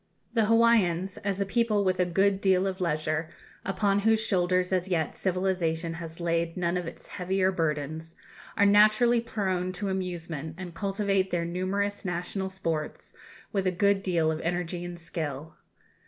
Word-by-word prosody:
The 225 -2 +3
Hawaiians, 210 -5 +3
as 200 -1 -2
a 200 - +1
people 215 0 +1
with 185 -1 +1
a 180 - +4
good 195 +2 +2
deal 190 -1 +3
of 190 0 -3
leisure, 155 -1 -1 0.3
upon 195 +1 +1
whose 220 +2 +3
shoulders 185 -3 +1
as 185 0 +1
yet 165 -5 -1
civilization 180 -3 -1
has 165 0 -8
laid 170 0 -1
none 175 0 0
of 180 -2 -2
its - - -9
heavier 190 0 0
burdens, 160 -1 -2 0.4
are 205 - +5
naturally 215 +4 +5
prone 190 -5 -2
to 195 +2 -3
amusement, 170 -5 -4
and 180 -2 -7
cultivate 195 0 0
their 170 -2 -1
numerous 195 +4 -2
national 185 +1 -3
sports 165 -5 -4 0.4
with 195 -2 0
a - - +3
good 200 +2 +2
deal 170 -4 +1
of 160 - -3
energy 175 +1 -2
and 175 0 -6
skill. 155 -2 -5
185 Hz, 160 wpm, -28 LUFS, 170-195 Hz, 0.4 s, are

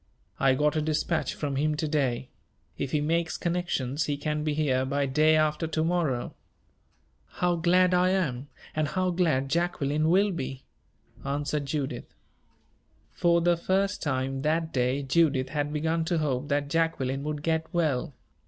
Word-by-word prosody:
"I 135 -1 +4
got 150 +3 +1
a 155 - +1
dispatch 155 +2 -1
from 140 -3 -3
him 150 +2 +1
to 155 +1 -2
day. 135 -5 -1 0.5
If 135 - -4
he 150 - +1
makes 165 +2 0
connections, 165 -5 -1
he 145 -1 -2
can 150 +1 -2
be 150 -1 -1
here 135 -4 +1
by 140 +2 0
day 155 +4 +3
after 155 +1 +1
to 160 0 -1
morrow." 160 -8 0 1.0
"How 180 -1 +1
glad 180 +2 +3
I 180 +1 +4
am 145 -9 -1 0.3
and 155 -1 +1
how 185 +3 0
glad 160 -7 +1
Jacqueline 155 -1 0
will 195 +4 +4
be!" 135 -6 -5 0.6
answered 145 +1 -2
Judith. 140 -1 -4 1.0
For 170 -1 +2
the 175 +1 +3
first 195 +4 0
time, 135 -1 -1
that 160 +2 0
day 130 +2 0
Judith 135 -2 +2
had 145 -1 -2
begun 160 +2 0
to 170 0 0
hope 145 -3 -1
that 145 0 0
Jacqueline 145 -4 0
would 150 0 -4
get 160 0 -1
well. 155 -5 0
150 Hz, 160 wpm, -27 LUFS, 140-170 Hz, 1.0 s, I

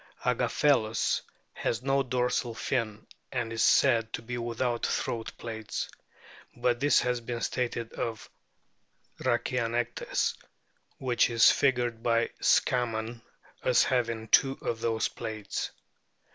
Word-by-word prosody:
Agaphelus* 115 -7 +2 0.3
has 120 +2 -2
no 135 0 +2
dorsal 125 -2 0
fin, 110 -4 -2 0.3
and 120 -3 -2
is 115 - -1
said 115 -4 +4
to - - -4
be 120 +2 -5
without 120 0 -2
throat 115 -1 -1
plaits; 110 -2 -4 0.7
but 120 0 +1
this 145 +2 +4
has 125 -1 -1
been 120 0 -4
stated 120 0 -2
of 115 -1 -4 0.9
Rhachianectes, 120 -1 0 0.6
which 125 -2 +2
is 115 -2 +6
figured 120 -4 +1
by 115 0 +1
Scammon 115 -2 +1 0.4
as - - +4
having 115 -3 0
two 135 0 +4
of 115 - -2
those 115 -1 0
plaits. 110 -2 -4
120 Hz, 115 wpm, -29 LUFS, 115-125 Hz, 0.9 s, is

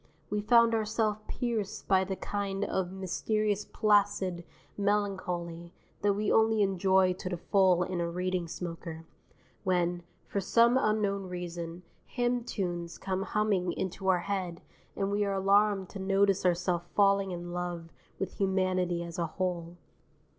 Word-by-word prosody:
We 210 0 0
found 235 +1 +5
ourself 215 -1 0
pierced 230 -5 -3
by 190 -1 +4
the 190 0 -3
kind 200 0 -2
of 185 -2 -1
mysterious 205 +2 -1
placid 205 -4 +2 0.3
melancholy 185 -4 -2 0.3
that 205 0 +3
we 210 0 0
only 220 -1 +4
enjoy 190 -1 +3
to 185 0 -6
the 180 - -3
full 185 -1 +3
in 180 -1 -2
a 170 - -1
Reading 180 0 -2
smoker, 165 -1 -6 0.6
when, 175 -2 +1 0.2
for 200 - -2
some 235 +5 +4
unknown 205 -5 +1
reason, 175 -1 -6 0.2
hymn 245 -1 0
tunes 175 -6 -3
come 190 0 -2
humming 195 -4 0
into 190 +1 -4
our 180 -2 +4
head 185 -3 -3 0.3
and 195 0 -1
we 205 +1 +1
are 200 -1 0
alarmed 195 0 +3
to 200 - -8
notice 195 0 +2
ourself 175 0 0
falling 200 -1 +4
in 175 -1 -5
love 175 -2 -4 0.2
with 195 - -5
humanity 185 -2 +1
as 170 0 -7
a 170 - 0
whole. 175 0 -3
190 Hz, 145 wpm, -30 LUFS, 175-205 Hz, 0.6 s, found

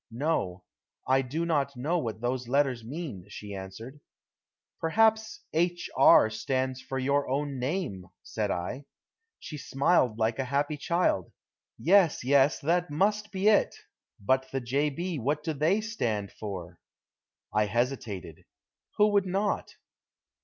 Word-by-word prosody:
"No. 115 - -2 0.4
I 130 +1 +4
do 150 +6 -3
not 140 -4 0
know 160 +8 0
what 115 -6 -4
those 125 0 -2
letters 130 -2 +1
mean," 130 - -6
she 105 -1 -8
answered. 105 +8 -8 0.8
"Perhaps 220 +5 +2
'H. 175 +2 0
R.' 125 -4 +7
stands 130 +3 -2
for 130 0 -5
your 140 +2 +1
own 140 0 -2
name," 125 - -3 0.2
said 105 -2 -3
I. 100 +11 -3 0.5
She 150 - -8
smiled 135 -4 +2
like 110 +1 0
a 135 - 0
happy 145 +3 0
child. 150 - 0 0.5
"Yes, 180 -4 +4
yes. 140 +2 +4
That 175 +3 +1
must 205 +7 0
be 195 +1 0
it. 215 -1 +4 0.4
But 130 +6 +1
the 135 - -1
'J. 135 +5 0
B.,' 170 +2 -4
what 145 +5 -1
do 160 - -1
they 160 +9 +2
stand 115 - -2
for?" 90 -5 -7 0.7
I 105 0 +2
hesitated 110 - -3 0.5
who 210 0 +5
would 200 -2 +2
not? 195 +3 -1
135 Hz, 140 wpm, -28 LUFS, 115-170 Hz, 0.8 s, R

